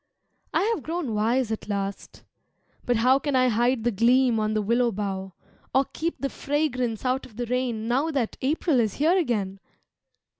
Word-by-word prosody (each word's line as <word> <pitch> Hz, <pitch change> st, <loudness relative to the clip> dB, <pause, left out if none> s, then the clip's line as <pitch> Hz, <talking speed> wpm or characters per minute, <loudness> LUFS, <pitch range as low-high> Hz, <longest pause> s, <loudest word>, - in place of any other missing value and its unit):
I -, -, +2 dB
have 385 Hz, -, -4 dB
grown 320 Hz, -7 st, -3 dB
wise 225 Hz, +3 st, +1 dB
at 220 Hz, -1 st, -5 dB
last 200 Hz, -1 st, -4 dB, 0.6 s
but 245 Hz, -, +3 dB
how 255 Hz, +4 st, +4 dB
Can 285 Hz, -1 st, -1 dB
I 255 Hz, 0 st, +4 dB
hide 240 Hz, +1 st, +1 dB
the 240 Hz, -, +2 dB
gleam 235 Hz, +2 st, +3 dB
on 215 Hz, 0 st, 0 dB
the 215 Hz, -, +2 dB
willow 235 Hz, +3 st, +2 dB
bough, 195 Hz, -2 st, -4 dB, 0.4 s
Or 270 Hz, +1 st, +4 dB
keep 335 Hz, +2 st, -2 dB
the 275 Hz, -, -1 dB
fragrance 255 Hz, -6 st, -1 dB
out 255 Hz, +1 st, +1 dB
of 225 Hz, -, -20 dB
the 245 Hz, +2 st, -3 dB
rain 240 Hz, -2 st, -2 dB
Now 265 Hz, +7 st, +1 dB
that 270 Hz, -7 st, -1 dB
April 290 Hz, 0 st, +1 dB
is 220 Hz, -4 st, 0 dB
here 320 Hz, +5 st, +3 dB
again? 210 Hz, -, -1 dB
245 Hz, 180 wpm, -25 LUFS, 220-265 Hz, 0.6 s, how